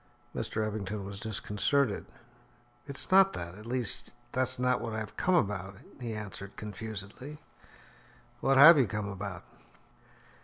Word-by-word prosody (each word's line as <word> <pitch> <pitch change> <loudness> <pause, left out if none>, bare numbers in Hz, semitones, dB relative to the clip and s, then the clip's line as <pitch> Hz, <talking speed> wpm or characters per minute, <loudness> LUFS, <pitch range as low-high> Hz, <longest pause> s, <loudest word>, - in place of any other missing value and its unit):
Mr. 110 0 -1
Eppington 105 -1 -4
was 100 0 -7
disconcerted. 110 +3 0 0.8
"It's 140 +5 -6
not 195 0 +7
that 85 0 -5
at 105 +4 -11
least 125 -2 0 0.2
that's 130 0 +1
not 125 0 +1
what 115 - -4
I - - -2
have 110 -1 -5
come 185 0 +2
about," 100 - 0 0.2
he 120 -3 -4
answered 100 -2 -7
confusedly. 110 +6 -7 1.0
"What 135 0 +3
have 155 +3 +10
you 125 - +4
come 105 0 -3
about?" 100 -3 -6
110 Hz, 140 wpm, -30 LUFS, 100-130 Hz, 1.0 s, have